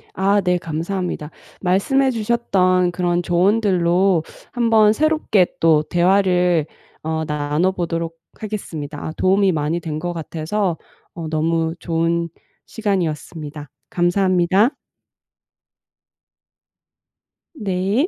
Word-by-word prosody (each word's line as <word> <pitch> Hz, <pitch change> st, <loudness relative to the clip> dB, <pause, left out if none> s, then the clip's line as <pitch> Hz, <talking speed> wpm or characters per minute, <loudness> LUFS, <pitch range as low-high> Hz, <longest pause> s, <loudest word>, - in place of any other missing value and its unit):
아 200 Hz, +2 st, +2 dB
네, 180 Hz, -1 st, +1 dB
감사합니다. 170 Hz, -1 st, -4 dB, 0.3 s
말씀해 260 Hz, +9 st, +2 dB
주셨던 195 Hz, -6 st, +1 dB
그런 175 Hz, 0 st, 0 dB
조언들로 180 Hz, -1 st, +2 dB, 0.3 s
한번 225 Hz, -3 st, +4 dB
새롭게 305 Hz, -, +2 dB
또 160 Hz, -2 st, +4 dB
대화를 180 Hz, -1 st, +2 dB, 0.4 s
어 160 Hz, 0 st, -2 dB
나눠 150 Hz, +4 st, 0 dB
보도록 165 Hz, -2 st, -3 dB, 0.2 s
하겠습니다. 160 Hz, -9 st, -6 dB
아 -, -, -3 dB
도움이 195 Hz, +1 st, +3 dB
많이 155 Hz, +1 st, -1 dB
된 155 Hz, -3 st, -5 dB
것 175 Hz, +1 st, -3 dB
같아서 170 Hz, +3 st, -2 dB, 0.4 s
어 165 Hz, -2 st, -6 dB
너무 160 Hz, +1 st, 0 dB
좋은 170 Hz, 0 st, -1 dB, 0.4 s
시간이었습니다. 160 Hz, -, -3 dB, 0.2 s
감사합니다. 185 Hz, +3 st, +2 dB, 2.9 s
네. 200 Hz, -, 0 dB
180 Hz, 225 characters per minute, -20 LUFS, 165-195 Hz, 2.9 s, 한번